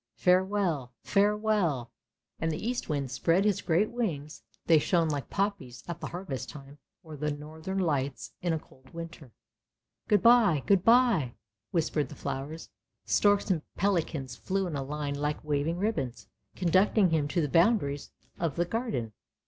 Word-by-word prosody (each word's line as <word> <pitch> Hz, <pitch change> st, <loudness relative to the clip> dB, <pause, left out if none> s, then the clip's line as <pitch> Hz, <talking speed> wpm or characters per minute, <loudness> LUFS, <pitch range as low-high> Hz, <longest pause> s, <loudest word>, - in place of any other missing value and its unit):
Farewell! 180 Hz, -8 st, +1 dB
Farewell! 200 Hz, -, +1 dB, 0.2 s
" -, -, -50 dB
and 160 Hz, -, +1 dB
the 155 Hz, +8 st, -4 dB
Eastwind 150 Hz, -, -2 dB
spread 170 Hz, +8 st, +2 dB
his 205 Hz, -3 st, +2 dB
great 180 Hz, +6 st, +1 dB
wings, 155 Hz, -11 st, -3 dB, 0.2 s
they 160 Hz, -2 st, +6 dB
shone 170 Hz, +1 st, +2 dB
like 145 Hz, -3 st, -3 dB
poppies 190 Hz, -, -2 dB
at 170 Hz, -1 st, -5 dB
the -, -, -4 dB
harvest 175 Hz, -7 st, -5 dB
time, 140 Hz, 0 st, -11 dB, 0.2 s
or 160 Hz, -2 st, -9 dB
the 150 Hz, +1 st, -2 dB
Northern 155 Hz, +5 st, -5 dB
Lights 140 Hz, -7 st, -1 dB
in 175 Hz, -, 0 dB
a 160 Hz, -, +1 dB
cold 130 Hz, -3 st, -17 dB
winter. 165 Hz, -6 st, -8 dB, 0.8 s
"Good 210 Hz, -3 st, +3 dB
bye! 220 Hz, -, +6 dB
good 195 Hz, -3 st, +4 dB
bye!" 225 Hz, -, +4 dB, 0.3 s
whispered 155 Hz, -5 st, 0 dB
the -, -, -9 dB
flowers. 150 Hz, +5 st, -5 dB, 0.3 s
Storks 205 Hz, -1 st, +3 dB
and 165 Hz, -4 st, +1 dB
pelicans 160 Hz, -9 st, -1 dB
flew 195 Hz, +8 st, -1 dB
in 170 Hz, -4 st, -4 dB
a 140 Hz, -, -2 dB
line 145 Hz, +1 st, -3 dB
like 145 Hz, +1 st, -2 dB
waving 150 Hz, +3 st, 0 dB
ribbons, 180 Hz, -, -2 dB, 0.3 s
conducting 185 Hz, +2 st, +3 dB
him 155 Hz, -3 st, +2 dB
to 170 Hz, -, -1 dB
the 150 Hz, -, +1 dB
boundaries 165 Hz, -, +2 dB, 0.3 s
of 165 Hz, -5 st, -1 dB
the 175 Hz, -, +1 dB
Garden. 175 Hz, -, -3 dB
165 Hz, 155 wpm, -29 LUFS, 145-195 Hz, 0.8 s, they